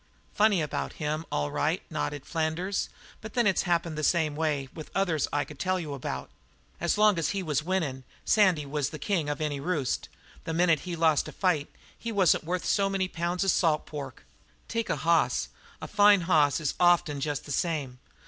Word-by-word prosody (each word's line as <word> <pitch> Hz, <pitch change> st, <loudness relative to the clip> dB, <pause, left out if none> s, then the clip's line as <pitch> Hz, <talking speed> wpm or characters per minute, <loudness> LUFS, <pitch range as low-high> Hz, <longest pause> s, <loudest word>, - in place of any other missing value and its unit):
"Funny 205 Hz, -5 st, +3 dB
about 150 Hz, -, -3 dB
him, 155 Hz, +2 st, -3 dB
all 75 Hz, 0 st, -1 dB
right," -, -, 0 dB
nodded 105 Hz, -, -3 dB
Flanders, 165 Hz, +4 st, -1 dB, 0.3 s
"but 220 Hz, -1 st, -9 dB
then 240 Hz, -1 st, +3 dB
it's 195 Hz, -2 st, +3 dB
happened 170 Hz, -2 st, +1 dB
the 155 Hz, -, -4 dB
same 155 Hz, -2 st, +2 dB
way 150 Hz, -3 st, -1 dB
with 155 Hz, -, -9 dB
others 175 Hz, -7 st, +1 dB
I 145 Hz, 0 st, 0 dB
could 150 Hz, -3 st, -12 dB
tell 185 Hz, +3 st, +1 dB, 0.2 s
about. 120 Hz, -, -5 dB, 0.5 s
As 170 Hz, +4 st, +1 dB
long 210 Hz, -4 st, +4 dB
as 160 Hz, -, 0 dB
he 190 Hz, -, -1 dB
was 150 Hz, -4 st, 0 dB
winnin' 155 Hz, -7 st, -2 dB, 0.2 s
Sandy 185 Hz, -8 st, +3 dB
was 145 Hz, 0 st, -2 dB
the 155 Hz, -, -7 dB
king 165 Hz, -3 st, -1 dB
of 145 Hz, -, -2 dB
any 150 Hz, -2 st, -2 dB
roost. 145 Hz, -5 st, -2 dB, 0.3 s
The 165 Hz, -, -3 dB
minute 170 Hz, -2 st, +4 dB
he 175 Hz, -, -2 dB
lost 160 Hz, -2 st, +2 dB
a -, -, -7 dB
fight 175 Hz, -7 st, 0 dB, 0.3 s
he 230 Hz, -, -5 dB
wasn't 190 Hz, -6 st, +3 dB
worth 180 Hz, +2 st, -2 dB
so 200 Hz, -1 st, +2 dB
many 195 Hz, -1 st, 0 dB
pounds 175 Hz, +1 st, -2 dB
of 195 Hz, -, +3 dB
salt 160 Hz, -3 st, +2 dB
pork. 140 Hz, -4 st, -8 dB, 0.4 s
Take 230 Hz, -1 st, -2 dB
a -, -, +1 dB
hoss; 160 Hz, +3 st, +2 dB, 0.3 s
a -, -, -6 dB
fine 205 Hz, -2 st, +5 dB
hoss 155 Hz, -5 st, +3 dB
is 155 Hz, -3 st, -1 dB
often 175 Hz, -4 st, +3 dB
jest 145 Hz, -1 st, -2 dB
the 145 Hz, -, -7 dB
same. 145 Hz, -6 st, -2 dB
160 Hz, 195 wpm, -28 LUFS, 150-185 Hz, 0.5 s, fine